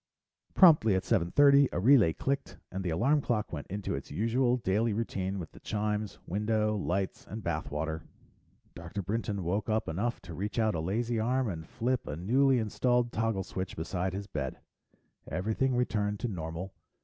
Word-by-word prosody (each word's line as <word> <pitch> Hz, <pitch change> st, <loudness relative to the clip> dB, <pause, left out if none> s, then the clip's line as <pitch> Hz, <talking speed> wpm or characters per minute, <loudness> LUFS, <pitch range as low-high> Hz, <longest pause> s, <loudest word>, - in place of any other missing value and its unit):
Promptly 150 Hz, -, +7 dB
at 95 Hz, -, 0 dB
seven 90 Hz, -7 st, +1 dB
thirty, 140 Hz, +3 st, +6 dB
a -, -, -1 dB
relay 115 Hz, -4 st, +6 dB
clicked 135 Hz, +11 st, -3 dB
and 95 Hz, +1 st, -4 dB
the 90 Hz, -, -1 dB
alarm 130 Hz, -, +2 dB
clock 110 Hz, -8 st, -1 dB
went 75 Hz, -3 st, -5 dB
into 100 Hz, +1 st, -3 dB
its -, -, -5 dB
usual 120 Hz, -, +1 dB
daily 115 Hz, -1 st, +1 dB
routine 100 Hz, -3 st, -2 dB
with 80 Hz, -4 st, -6 dB
the -, -, -14 dB
chimes, 105 Hz, -1 st, -2 dB
window, 105 Hz, +2 st, 0 dB
lights, 95 Hz, -1 st, -2 dB
and 105 Hz, +3 st, -7 dB
bath 80 Hz, -4 st, -2 dB
water. 80 Hz, +2 st, -3 dB, 0.7 s
Dr. 85 Hz, +4 st, -6 dB
Brinton 105 Hz, 0 st, -2 dB
woke 100 Hz, +7 st, -1 dB
up 110 Hz, 0 st, 0 dB
enough 105 Hz, +9 st, -1 dB
to 85 Hz, -, -8 dB
reach 100 Hz, +7 st, -4 dB
out 110 Hz, -2 st, +2 dB
a 85 Hz, -, -2 dB
lazy 115 Hz, +7 st, -1 dB
arm 125 Hz, +3 st, +1 dB
and 80 Hz, -4 st, -6 dB
flip 125 Hz, +2 st, -1 dB
a 75 Hz, -, -3 dB
newly 130 Hz, -, +3 dB
installed 120 Hz, +2 st, +1 dB
toggle 110 Hz, -4 st, 0 dB
switch 95 Hz, 0 st, -5 dB
beside 90 Hz, +3 st, -2 dB
his 100 Hz, +1 st, -4 dB
bed. 70 Hz, -8 st, -4 dB, 0.7 s
Everything 110 Hz, -, 0 dB
returned 105 Hz, -4 st, 0 dB
to 120 Hz, -, 0 dB
normal. 90 Hz, -1 st, -5 dB
105 Hz, 175 wpm, -30 LUFS, 90-120 Hz, 0.7 s, Promptly